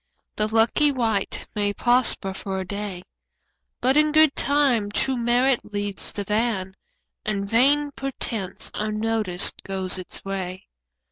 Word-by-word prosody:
The 215 - +1
lucky 225 +7 +3
wight 225 -6 -1
may 205 -1 0
prosper 240 -5 +1
for 190 0 -4
a 190 - -3
day, 200 -2 -4 0.8
But 260 +2 +3
in 305 0 +4
good 310 -1 +5
time 275 -7 +2
true 265 +5 +2
merit 245 +2 +2
leads 205 -1 -4
the 205 - -3
van 210 -2 0 0.5
And 200 -2 -2
vain 285 +7 +3
pretence, 235 -8 -4
unnoticed, 215 -3 -1
goes 190 -1 -2
its 185 - -8
way. 190 -1 -4
215 Hz, 130 wpm, -24 LUFS, 195-250 Hz, 0.8 s, good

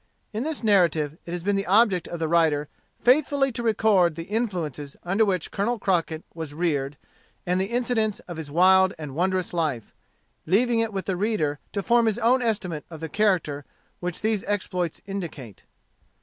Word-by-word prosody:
In 215 - -2
this 305 -1 -3
narrative 165 -7 +2
it - - -5
has 175 -1 -4
been 200 +1 +1
the 195 0 -1
object 195 -3 +4
of 170 - -5
the 160 - 0
writer 155 -3 +2 0.3
faithfully 275 +1 +3
to 240 - -4
record 210 -7 +3
the 165 - -5
influences 170 - -3
under 195 +5 +2
which 185 -6 -1
Colonel 235 +5 0
Crockett 170 -5 0
was 160 -3 -7
reared, 145 -4 -1 0.5
and 180 +1 +1
the - - +1
incidents 235 -2 0
of 175 -2 -9
his 160 -3 -6
wild 185 +4 +5
and 150 -4 -7
wondrous 185 +3 0
life, 150 -10 -2 0.5
leaving 230 +6 +3
it 225 -1 0
with 195 -2 -4
the 190 - -1
reader 180 -8 0
to 200 - -2
form 235 +1 +3
his 220 -1 +1
own 240 +2 +3
estimate 200 -9 -1
of 160 -2 -9
the 160 0 -5
character 170 -6 +1 0.4
which 180 -1 -4
these 215 -2 0
exploits 180 -5 -2
indicate. 165 - -7
185 Hz, 180 wpm, -25 LUFS, 160-215 Hz, 0.5 s, wild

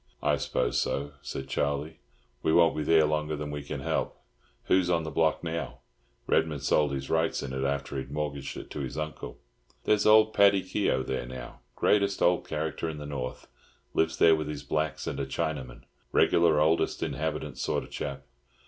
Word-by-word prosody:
"I - - +3
suppose - - 0
so," 70 +1 -2
said 65 - -6
Charlie. 70 +3 -2 0.4
"We - - +1
won't 85 0 +5
be 75 - -1
there 80 +1 +4
longer 75 0 -1
than 75 0 -5
we 75 0 -4
can 70 -1 -6
help. - - -2 0.4
Who's 90 -1 +2
on 85 -2 +2
the 80 - -5
block 80 +2 +1
now? 85 0 -4 0.4
Redman 75 -4 +1
sold 75 +2 +2
his 70 0 -4
rights 80 0 +1
in 65 -1 -5
it 65 0 -2
after 70 0 -2
he'd 65 0 -7
mortgaged 70 -1 -4
it - - -9
to - - -5
my 70 -2 -3
uncle." 75 - -8 0.5
"There's 105 0 +3
old 110 0 +6
Paddy 100 -1 +5
Keogh 95 -9 0
there 65 -2 -3
now—greatest 100 +10 -1
old 90 0 +3
character 80 +1 -2
in 80 - -6
the 75 - -7
North. 65 -4 -5 0.5
Lives 80 0 +1
there 80 -1 +6
with 75 -1 -3
his 75 -1 -5
blacks 80 0 -2
and - - -3
a 70 - -1
Chinaman. 65 -2 -3 0.3
Regular 85 -3 +4
oldest 80 +2 +2
inhabitant 75 -2 -3
sort - - -1
of - - -14
chap. 70 -1 -5
75 Hz, 185 wpm, -28 LUFS, 70-80 Hz, 0.5 s, old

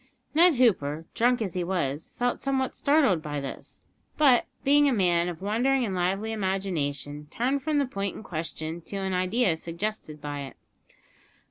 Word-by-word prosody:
Ned 335 +1 +6
Hooper, 165 - +2
drunk 245 0 +2
as 190 -5 -4
he 180 - -1
was, 165 -5 -2
felt 245 0 0
somewhat 265 -1 -1
startled 280 - +3
by 145 -2 -4
this, 140 -1 -8 0.3
but, 270 -5 +5 0.2
being 290 +1 +5
a - - +1
man 175 -4 +2
of 175 +1 -7
wandering 245 +5 +2
and 200 - -3
lively 190 +4 0
imagination, 155 -8 -2
turned 260 - 0
from 300 +2 0
the 285 - +3
point 200 -6 -3
in - - -9
question 160 -1 -5
to 185 - -9
an 190 -1 -2
idea 185 +1 +2
suggested 170 -1 -5
by 145 0 -5
it. 135 -1 -8
190 Hz, 165 wpm, -27 LUFS, 165-245 Hz, 0.3 s, Ned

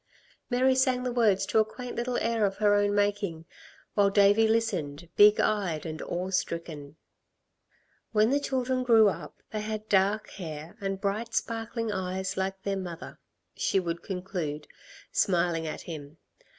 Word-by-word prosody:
Mary 260 +1 +3
sang 260 -1 +2
the 250 - -1
words 210 -5 +3
to 220 - +2
a - - +6
quaint 245 +3 -8
little 240 +1 -1
air 230 -1 0
of 195 -1 +1
her 210 -1 +4
own 205 0 +2
making, 205 -5 0 0.5
while 200 -1 +4
Davey 205 +2 +5
listened, 175 -9 -1
big 210 0 +7
eyed 185 -8 0
and 155 -1 -5
awe 180 +2 -3
stricken. 160 -5 -3 1.2
"When 215 +2 +3
the 285 - +3
children 260 -2 -1
grew 225 -4 +6
up - - -8
they 215 - -3
had 215 0 -4
dark 200 +2 +2
hair 160 -3 -7
and 195 -1 -2
bright, 215 +3 -2
sparkling 230 0 -2
eyes 190 -1 -3
like 190 0 -3
their 200 -1 -1
mother," 175 -3 -7 0.4
she 195 - +1
would 170 -2 -3
conclude, 180 -6 -4 0.4
smiling 170 -3 +1
at 155 - -5
him. 155 -2 -8
200 Hz, 155 wpm, -28 LUFS, 175-220 Hz, 1.2 s, big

